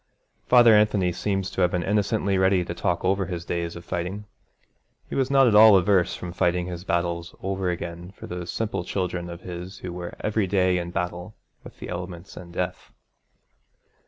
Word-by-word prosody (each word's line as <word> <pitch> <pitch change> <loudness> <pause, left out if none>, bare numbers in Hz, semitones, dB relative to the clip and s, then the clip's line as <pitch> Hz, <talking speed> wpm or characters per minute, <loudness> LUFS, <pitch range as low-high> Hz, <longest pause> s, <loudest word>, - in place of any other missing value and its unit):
Father 120 -2 +7
Anthony 105 -4 +3
seems 95 +1 -2
to - - -2
have 90 - +4
been 90 -1 -1
innocently 100 0 +1
ready 95 -1 +3
to 85 - -4
talk 85 0 -1
over 95 0 +1
his 85 -3 -5
days 85 -1 -3
of 85 0 -10
fighting. 90 +4 -4 0.8
He - - -9
was 135 -1 +1
not 135 -1 +5
at 115 - +3
all 105 -1 +9
averse 95 -1 +2
from 90 -1 -7
fighting 90 0 +1
his 90 -1 -6
battles 85 -2 -2
over 95 -1 -1
again 85 0 -5
for 95 - -11
these 90 -1 -6
simple 110 -3 -2
children 90 -2 -3
of 85 0 -8
his 90 +1 -7
who 90 -1 -7
were 90 -1 -6
every 105 -2 0
day 90 -1 +2
in 85 0 -4
battle 90 +3 -4 0.3
with - - -13
the - - -8
elements 90 0 -7
and 85 -1 -10
death. 90 +1 -4
90 Hz, 190 wpm, -25 LUFS, 85-100 Hz, 0.8 s, all